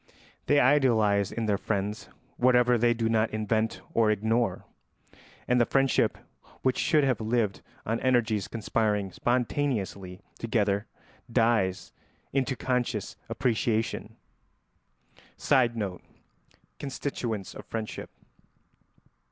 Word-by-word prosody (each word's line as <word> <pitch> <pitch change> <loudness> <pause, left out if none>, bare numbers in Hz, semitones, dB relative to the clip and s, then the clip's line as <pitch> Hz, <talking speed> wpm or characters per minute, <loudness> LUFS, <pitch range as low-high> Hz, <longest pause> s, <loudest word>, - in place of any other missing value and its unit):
They 145 - +5
idealise 115 -8 +3
in 115 - -2
their 100 -2 +1
friends 105 0 -3 0.3
whatever 125 0 +4
they 120 0 +3
do 115 -1 0
not 110 0 +2
invent 110 +1 -1
or 115 -2 +3
ignore, 110 +3 0 0.8
and 125 0 +3
the - - +4
friendship 135 -2 +2 0.5
which 130 -1 +1
should 155 -3 +3
have 130 -4 +1
lived 110 -3 0 0.2
on 115 +2 -1
energies 120 -5 +1
conspiring 105 -3 -1
spontaneously 115 -7 -1 0.2
together 105 -2 0 0.4
dies 115 -6 +1 0.4
into 135 -1 0
conscious 125 -2 -2
appreciation. 115 -3 -1 1.2
[Sidenote: 115 -8 +1 0.8
Constituents 125 -7 -4
of - - -9
friendship. 110 -1 -5
115 Hz, 100 wpm, -28 LUFS, 105-125 Hz, 1.2 s, They